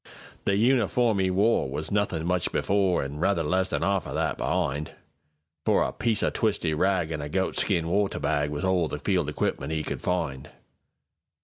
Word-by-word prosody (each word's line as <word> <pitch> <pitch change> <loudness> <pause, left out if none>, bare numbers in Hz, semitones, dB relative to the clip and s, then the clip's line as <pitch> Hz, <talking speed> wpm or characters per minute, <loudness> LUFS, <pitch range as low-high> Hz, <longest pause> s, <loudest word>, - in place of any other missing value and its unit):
The 100 - +2
uniform 115 -2 +2
'e 95 - +2
woreWas 90 - +1
nothin' 100 -6 0
much 90 0 0
before, 95 -4 +1
An' 70 +2 -6
rather 85 -1 +1
less 95 +5 +1
than - - -1
'arf 100 +1 0
o' - - -5
that - - 0
be'ind, 75 +2 -1 0.7
For - - +3
a - - -1
twisty 110 -4 0
piece - - 0
o' - - -1
ragAn' 85 -3 0
a 75 - -5
goatskin 95 0 0
water 100 +3 0
bagWas 75 0 -1
all 95 -3 +2
the 75 - -4
field 90 -2 0
equipment 75 0 -2
'e 80 -1 -1
could - - -4
find. 80 -7 -2
90 Hz, 170 wpm, -26 LUFS, 75-100 Hz, 0.7 s, For